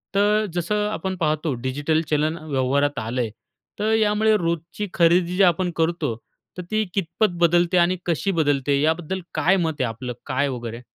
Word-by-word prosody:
तर 210 +2 +3
जसं 210 +4 0
आपण 190 -2 -3
पाहतो 155 -2 0
डिजिटल 145 +5 0
चलन 155 +2 +1
व्यवहारात 140 +1 +1
आलं 120 +3 -2
आहे, 110 -3 -3 0.5
तर 215 +1 +1
यामुळे 215 0 +3
रोजची 170 +3 -3
खरेदी 175 +1 +3
जे 195 - +5
आपण 180 0 +2
करतो, 160 -6 0 0.4
तर - - -3
ती 215 0 +2
कितपत 195 +3 0
बदलते 175 +1 +3
आणि 175 +2 +3
कशी 175 +3 0
बदलते, 145 -4 +1
याबद्दल 165 +4 0
काय 190 +3 +3
मत 165 -3 0
आहे 125 - +1
आपलं, 125 +2 -5
काय 140 +2 0
वगैरे? 120 -2 -6
165 Hz, 165 wpm, -23 LUFS, 145-190 Hz, 0.5 s, जे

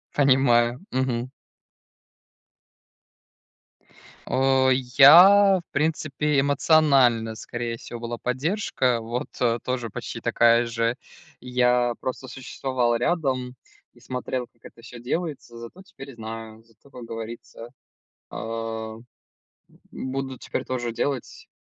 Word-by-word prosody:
Понимаю. 125 -4 +3
Мгм. 130 -1 -1 3.0
Э, 130 0 +2
я, 175 +10 +7
в 170 - -18
принципе, 150 -1 0
эмоционально 135 -5 +3
скорее 120 +1 -5
всего 120 +1 -9
была 120 0 -5
поддержка 130 - -1
вот 120 +2 -4 0.3
тоже 125 -2 -3
почти - - -7
такая 120 0 +3
же. 115 0 -1 0.4
Я 125 -1 +1
просто 130 +1 -5
существовал 130 -1 -2
рядом, 130 -4 -1 0.4
и - - -21
смотрел 125 0 -4
как 115 -1 -39
это 115 - -14
всё 120 +1 -11
делается. 135 -1 -4
Зато 115 +11 -11
теперь 145 -8 -12
знаю, 110 0 -9
зато 115 +4 -24
как 125 - -10
говорится, 115 0 -8 0.6
э, 110 -1 -5 0.9
буду 130 0 -5
теперь - - -4
тоже 120 -2 -3
делать, 130 +2 -4
125 Hz, 105 wpm, -24 LUFS, 115-135 Hz, 3.0 s, я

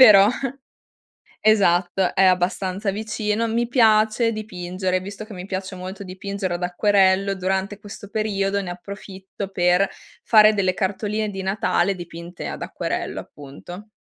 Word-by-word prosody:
però 205 -6 +9 1.1
esatto, 190 -3 +3
è 195 - +4
abbastanza 185 +2 +1
vicino, 215 +1 -1
mi 235 +1 0
piace 225 -1 +4
dipingere: 185 -3 -3
visto 200 +3 -8
che 215 0 -11
mi 180 -1 -7
piace 190 0 -4
molto 190 +2 -7
dipingere 190 -1 -4
ad 180 - -5
acquerello, 195 +1 +3
durante 190 +2 -2
questo 205 -1 -10
periodo 200 -2 0
ne 180 -2 -5
approfitto, 195 +1 -8
per 180 +1 +3 0.4
fare 215 -1 +6
delle 190 -3 +1
cartoline 210 +3 -1
di 195 -1 -5
Natale 195 -1 +1
dipinte 170 0 -8
ad - - -5
acquerello - - -3
appunto. 175 +8 -11
195 Hz, 130 wpm, -22 LUFS, 185-210 Hz, 1.1 s, però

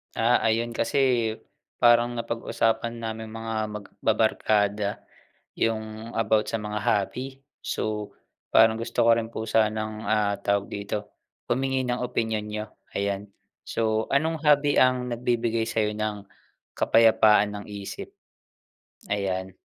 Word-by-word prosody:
Ah, 115 +2 +4
ayun 115 +1 0
kasi 115 +5 0 0.4
eh, - - -15 0.4
parang 120 0 +5
napag-usapan 115 0 -1
naming 110 -1 -5
mga 115 0 -5
magbabarkada 105 0 0 0.5
yung 110 0 -3
about 110 -1 +2
sa - - -1
mga 105 -1 -4
hobby. 130 +8 -2 0.2
So, 105 -1 -3 0.4
parang 110 0 +5
gusto 115 0 0
ko 115 - +6
rin 115 -1 +1
po 110 -1 -5
sanang, 110 -1 0
ah, 105 -1 +1
tawag 100 0 0
dito, 100 +1 -4 0.3
humingi 130 +1 0
ng 125 0 -1
opinyon 110 -3 -1
niyo, 105 0 -5 0.2
ayan. 100 0 -2 0.4
So, 110 -1 0
anong 160 +3 +1
hobby 145 -1 +4
ang 125 -1 +2
nagbibigay 115 -1 0
sa 110 -1 +1
iyo 105 - -1
ng 105 -1 -3 0.5
kapayapaan 110 -2 +4
ng - - -10
isip? 100 -1 -7 1.0
Ayan. 95 -2 -2
110 Hz, 125 wpm, -26 LUFS, 105-115 Hz, 1.0 s, ko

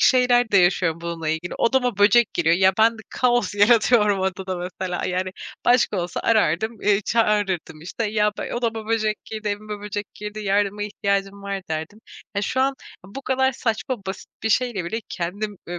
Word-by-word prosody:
şeyler 245 -2 +4
de 200 - +4
yaşıyorum 175 -3 +3
bununla 170 -2 -4
ilgili; 160 +3 -2
odama 245 -3 +1
böcek 210 +3 +5
geliyor 165 -1 +3
ya, 190 +1 +4
ben 225 +1 +4
kaos 245 -4 +1
yaratıyorum 210 -1 +4
odada, 190 0 -2
mesela, 180 0 -4
yani, 185 +1 -1 0.3
başka 245 -4 +3
olsa 175 0 -4
arardım, 220 0 +1
eee, 205 -1 +3
çağırırdım 205 -8 0
işte 185 +8 -4
ya, 210 -1 +2
be - - -4
"Odama 225 -2 -2
böcek 215 -1 -1
girdi, 215 -1 -5
evime 210 0 -4
böcek 205 0 -6
girdi, 210 +1 -7
yardıma 205 0 0
ihtiyacım 200 -1 -2
var." 200 0 -3
derdim. 160 +7 -5 0.4
Ya, 200 - +1
şu 260 - 0
an 270 +1 +2 0.3
bu 200 +9 -9
kadar 265 0 +1
saçma, 240 +2 -2
basit 190 0 -6
bir 220 - 0
şeyle 230 -5 +1
bile 220 +7 -3
kendim, 200 +4 -4
eee, 175 0 -5
205 Hz, 170 wpm, -23 LUFS, 185-225 Hz, 0.4 s, böcek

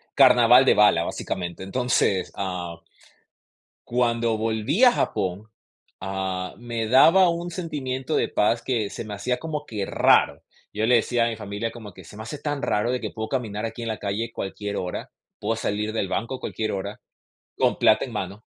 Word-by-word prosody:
carnaval 125 -1 +7
de - - +6
bala, 105 -5 +5
básicamente. 85 +1 -4
Entonces 100 -3 0
ah 90 -3 -4 1.1
cuando 115 -2 +1
volví 115 - +1
a 245 - +7
Japón, 95 - -2 0.5
ah, 95 -1 -3
me 115 -2 -3
daba 165 +9 +6
un 170 +1 -2
sentimiento 150 -5 -3
de - - +1
paz, 115 +3 +1
que 110 -6 -1
se - - -6
me 105 -1 -6
hacía 125 +5 -2
como 150 -2 -5
que 105 -3 -3
raro. - - +3 0.3
Yo 110 +2 -1
le 125 - +5
decía 120 +1 +1
a - - +1
mi 115 - -4
familia, 105 +2 -4
como 110 -4 -10
que 95 0 -14
se 105 - -13
me 110 - -7
hace 115 +7 -7
tan 145 -1 -3
raro, 105 +3 0
de 125 - -1
que - - -4
puedo 110 -1 -5
caminar 110 -5 -3
aquí 115 +1 -7
en 115 - -3
la 110 - -3
calle, 105 +3 -3
cualquier 100 0 -5
hora. 90 -1 -4 0.3
Puedo 110 +2 -1
salir 105 0 -2
del 105 -3 -1
banco 115 +7 -2
a - - -16
cualquier 110 -1 -3
hora, 95 -1 -5 0.6
con - - +2
plata - - +4
en - - -10
mano. 100 +3 -5
110 Hz, 185 wpm, -24 LUFS, 100-125 Hz, 1.1 s, carnaval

